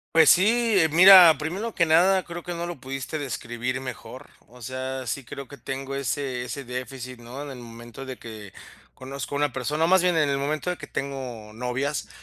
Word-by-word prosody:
Pues, 160 -2 +7
sí, 225 +4 +4
eh, 160 -2 +3
mira, 180 -1 +9
primero 190 +9 -4
que 170 -2 +2
nada, 185 +4 +4
creo 175 -1 -8
que 175 - -5
no 170 0 -4
lo 175 -5 -7
pudiste 135 +4 -5
describir 125 -2 -4
mejor, 130 -2 -9 0.2
o 125 +2 -17
sea, 130 +1 -5
sí 140 - -4
creo 135 +2 -8
que 140 - -12
tengo 135 +1 -5
ese 135 -1 -2
ese 135 +2 -6
déficit, 125 0 -7
¿no? 120 +4 -9
En 145 - -7
el 130 - -8
momento 120 +2 -10
de 130 -1 -7
que 110 -4 -10 0.4
conozco 135 +1 -7
a - - 0
una 145 -1 +1
persona, 150 +6 -1
o - - +1
más 185 0 +4
bien, 180 -1 +2
en 155 -3 +2
el 140 - 0
momento 150 +5 -2
de 180 - -2
que - - -9
tengo 130 -6 -6
novias, 125 +5 -3
140 Hz, 210 wpm, -25 LUFS, 125-160 Hz, 0.4 s, mira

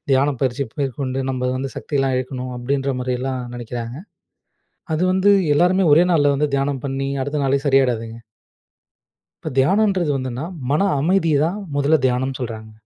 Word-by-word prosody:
தியானம் 135 0 +2
பயிற்சி 135 +2 0 0.2
மேற்கொண்டு 135 0 -2
நம்ம 125 -1 -1
வந்து 135 +1 -3
சக்தியெல்லாம் 135 -3 -1
இழக்கணும்" 130 0 -4
அப்படின்ற 135 +2 -1
மாதிரியெல்லாம் 125 +1 -2
நெனைக்கிறாங்க. 120 0 -6 1.0
அது 160 +4 0
வந்து 190 +2 +4 0.2
எல்லோருமே 180 +4 +3
ஒரே 170 +4 +6
நாள்ல 145 -3 +3
வந்து 150 +1 0
தியானம் 135 -1 -1
பண்ணி, 135 0 -2
அடுத்த 145 +1 -2
நாளே 135 +1 +2
சரியாயிடாதுங்க. 120 -4 +1 1.3
இப்போ 155 - -4
தியானம்ன்றது 190 +2 +2
வந்துன்னா, 130 0 -4 0.3
மன 150 +6 +2 0.2
அமைதிய 165 0 +2
தான் 175 +5 -1 0.2
முதல்ல 145 +2 +3
தியானம்னு 130 +1 0
சொல்றாங்க. 110 -2 -6
135 Hz, 140 wpm, -20 LUFS, 125-150 Hz, 1.3 s, ஒரே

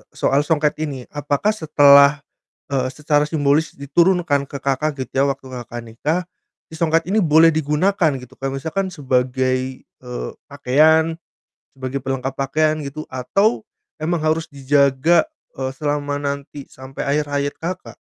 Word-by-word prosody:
soal 140 +2 +2
songket 150 -2 +1
ini. 140 -5 -4
Apakah 145 +7 0
setelah, 145 -5 +5 0.5
eee, 130 -1 0
secara 150 +1 +1
simbolis 150 +1 +1
diturunkan 150 -1 +1
ke 140 - -6
Kakak, 140 +2 -1
gitu 130 - -6
ya, - - +4
waktu 135 -1 -4
Kakak 120 -1 -7
nikah, 145 +10 -2 0.5
si 160 - -13
songket 165 +1 +1
ini 205 +2 +2
boleh 160 0 +5
digunakan, 160 +3 +1
gitu? 125 +1 -13
Kayak 135 0 -4
misalkan 190 +4 -2
sebagai, 130 -3 -1
eee, 125 -1 -7 0.2
pakaian, 155 +4 +3 0.6
sebagai 130 +1 -4
pelengkap 135 0 -3
pakaian, 155 +3 0
gitu, 145 +2 -7
atau 195 - 0 0.4
memang 170 0 0
harus 160 +1 -1
dijaga, 140 +3 +3 0.3
eee, 130 0 -3
selama 145 -1 -2
nanti 140 0 -5
sampai 130 +1 -8
akhir 145 +1 +1
hayat 145 0 -1
Kakak? 180 +2 -5
145 Hz, 140 wpm, -20 LUFS, 135-160 Hz, 0.6 s, setelah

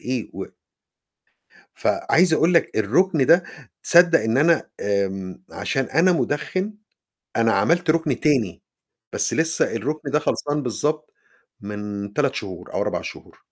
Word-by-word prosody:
إيه 125 -2 -3
و - - -5 1.3
فعايز 175 -1 +2
أقول 165 +3 +2
لك 170 - +2
الرُكن 140 - +2
ده 170 +3 +5 0.4
تصدّق 170 -1 +5
إن 110 +3 0
أنا 165 +3 +3
آمم، 95 -2 -2
عشان 135 - -2
أنا 165 +8 +3
مُدخِّن 185 +6 -2 0.6
أنا 115 -1 +3
عملت 170 +4 +2
رُكن 155 -5 0
تاني، 130 - +1 0.5
بس - - -1
لسّه 160 0 +1
الرُكن 140 +6 -3
ده 150 - +3
خلصان 145 0 -1
بالضبط 150 +5 -2 0.5
من 105 0 -6
3 140 -2 +1
شهور 95 -4 -7
أو - - 0
4 - - -2
شهور. - - -10
145 Hz, 135 wpm, -22 LUFS, 110-165 Hz, 1.3 s, ده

